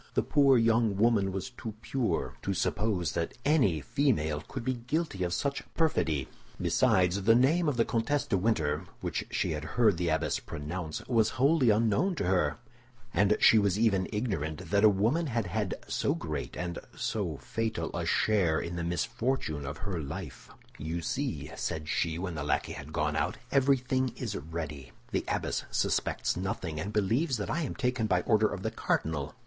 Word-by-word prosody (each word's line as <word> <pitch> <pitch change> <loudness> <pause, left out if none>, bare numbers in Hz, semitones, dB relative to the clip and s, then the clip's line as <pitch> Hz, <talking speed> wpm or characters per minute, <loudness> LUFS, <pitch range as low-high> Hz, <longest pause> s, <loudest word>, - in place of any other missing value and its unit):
The - - +3
poor 140 -3 +5
young 115 -3 +3
woman 105 -3 +3
was 95 +7 -4
too 115 -3 -7
pure 115 -11 -1
to - - -2
suppose 100 -5 0
that 85 -1 -3
any 130 - +3
female 80 - +1
could 115 +7 -7
be 130 - +1
guilty 155 - -1
of 90 - -1
such 140 +8 -1
perfidy; 80 - +1 0.3
besides, 90 +1 +3
the 115 +4 +5
name 155 +7 +4
of 135 - -2
the 115 - +3
Comtesse 135 +5 0
de - - 0
Winter, 85 -7 0 0.2
which - - -3
she - - -1
had 75 -1 -3
heard 105 +4 +2
the 85 -1 0
abbess 80 - 0
pronounce, 80 +1 -5
was 115 0 +2
wholly 135 0 +4
unknown 115 - +2
to - - -2
her, 90 -5 +1 0.6
and 105 +3 +3
she 110 - +7
was 100 -2 +2
even 100 -4 +2
ignorant 95 -10 -3
that 100 0 +3
a 110 - +9
woman 115 - +1
had 115 -4 -1
had 100 +1 -2
so - - 0
great 75 -4 -4
and 85 -1 -3 0.2
so - - -2
fatal 110 -1 -3
a - - -1
share 90 -8 +2
in 85 +1 -4
the 85 - -2
misfortune 85 - -1
of 70 +2 -5
her 95 -5 -4
life. 75 -1 -7 0.3
"You 80 +3 -3
see," - - -3
said 75 -1 -3
she, 80 +2 0
when 90 0 -3
the 75 -3 -4
lackey 75 - 0
had 70 +3 -8
gone 75 -2 0
out, 80 -1 0
"everything 130 -2 +2
is - - -3
ready. 75 -5 -6 0.2
The - - -1
abbess - - -1
suspects - - 0
nothing, 90 -4 -3
and 95 +7 -3
believes 115 - +1
that 105 - -3
I 170 - 0
am 145 - -3
taken 125 -4 0
by 90 -3 +2
order 110 -1 +4
of 95 - -5
the - - -1
cardinal. 75 -3 -1
100 Hz, 180 wpm, -30 LUFS, 80-120 Hz, 0.6 s, a